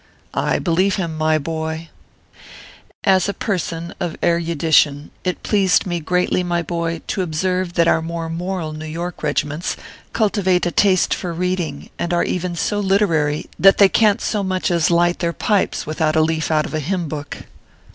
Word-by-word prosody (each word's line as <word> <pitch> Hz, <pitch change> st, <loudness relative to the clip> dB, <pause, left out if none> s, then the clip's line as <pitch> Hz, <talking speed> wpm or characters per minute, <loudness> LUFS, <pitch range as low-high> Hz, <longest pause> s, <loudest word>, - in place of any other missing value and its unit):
I -, -, +1 dB
believe 185 Hz, +2 st, +1 dB
him, 170 Hz, -4 st, -3 dB
my 155 Hz, 0 st, +2 dB
boy! 160 Hz, +1 st, -4 dB, 1.1 s
As 190 Hz, 0 st, +3 dB
a 200 Hz, -, -3 dB
person 170 Hz, -3 st, -3 dB
of 175 Hz, -2 st, -3 dB
erudition, 160 Hz, -3 st, +2 dB
it 180 Hz, -1 st, -3 dB
pleased 195 Hz, -3 st, +2 dB
me 175 Hz, -2 st, -2 dB
greatly, 180 Hz, +3 st, +1 dB
my 175 Hz, -1 st, -1 dB
boy, 165 Hz, -1 st, -3 dB
to 195 Hz, -, -2 dB
observe 180 Hz, +2 st, -1 dB
that 170 Hz, -1 st, +3 dB
our 165 Hz, -, +3 dB
more 165 Hz, 0 st, -4 dB
moral 170 Hz, -1 st, -3 dB
New 155 Hz, +1 st, -7 dB
York 170 Hz, +3 st, -5 dB
regi -, -, 0 dB
ments 150 Hz, +4 st, -4 dB, 0.3 s
cultivate 195 Hz, -5 st, +1 dB
a 175 Hz, -, 0 dB
taste 190 Hz, -2 st, +3 dB
for 180 Hz, -, -3 dB
reading, 180 Hz, -1 st, -3 dB
and 175 Hz, 0 st, 0 dB
are 175 Hz, -, +2 dB
even 180 Hz, -1 st, -2 dB
so 205 Hz, +4 st, -1 dB
literary 170 Hz, -7 st, +1 dB
that 195 Hz, +1 st, +7 dB
they 200 Hz, -1 st, +7 dB
can 210 Hz, -1 st, +4 dB
t -, -, -9 dB
so 210 Hz, -, 0 dB
much 185 Hz, -1 st, -1 dB
as 170 Hz, -2 st, +2 dB
light 175 Hz, 0 st, +2 dB
their 170 Hz, -1 st, -1 dB
pipes 205 Hz, +2 st, 0 dB
without 155 Hz, 0 st, 0 dB
a 160 Hz, -, +4 dB
leaf 160 Hz, 0 st, 0 dB
out 155 Hz, -1 st, +2 dB
of -, -, -7 dB
a 155 Hz, -, 0 dB
hymn 170 Hz, +3 st, -2 dB
book. 145 Hz, -1 st, -6 dB
170 Hz, 180 wpm, -20 LUFS, 160-185 Hz, 1.1 s, that